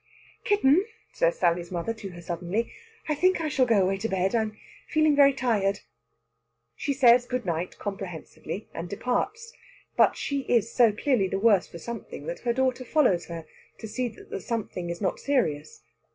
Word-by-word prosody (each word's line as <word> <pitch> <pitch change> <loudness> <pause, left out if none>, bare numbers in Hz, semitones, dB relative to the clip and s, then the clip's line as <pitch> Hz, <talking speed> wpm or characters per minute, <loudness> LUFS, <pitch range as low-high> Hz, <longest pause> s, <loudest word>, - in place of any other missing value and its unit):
"Kitten," 375 -4 +4 0.3
says - - +1
Sally's 170 +1 +1
mother 175 +6 -2
to 220 -3 -8
her 175 -1 -10
suddenly, 175 +6 -2 0.4
"I 305 - +1
think 370 +5 +2
I 320 -2 -1
shall 260 -2 +2
go 215 -5 +4
away 195 +1 +1
to 220 +3 -3
bed. 190 0 0
I'm 220 -2 0 0.3
feeling 310 -1 +3
very 280 -1 +7
tired." 215 -7 0 0.9
She 285 - -2
says 245 -2 +5
good 250 -1 -2
night 170 0 -3
comprehensively, 195 0 -6
and 170 +1 -6
departs. 410 - -2 0.4
But - - +4
she 280 -1 -2
is 230 -1 +2
so 235 -3 +5
clearly 210 -1 +1
the 190 - -2
worse 205 -2 +4
for - - -10
something 235 +7 -7
that - - -5
her 240 - 0
daughter 260 0 0
follows 250 - +2
her 165 -1 -7 0.3
to 220 - -7
see 250 +4 -2
that 225 - -13
the - - -3
something 200 -6 -4
is 170 +2 -5
not 190 - -1
serious. 160 - -1
225 Hz, 180 wpm, -27 LUFS, 190-265 Hz, 0.9 s, very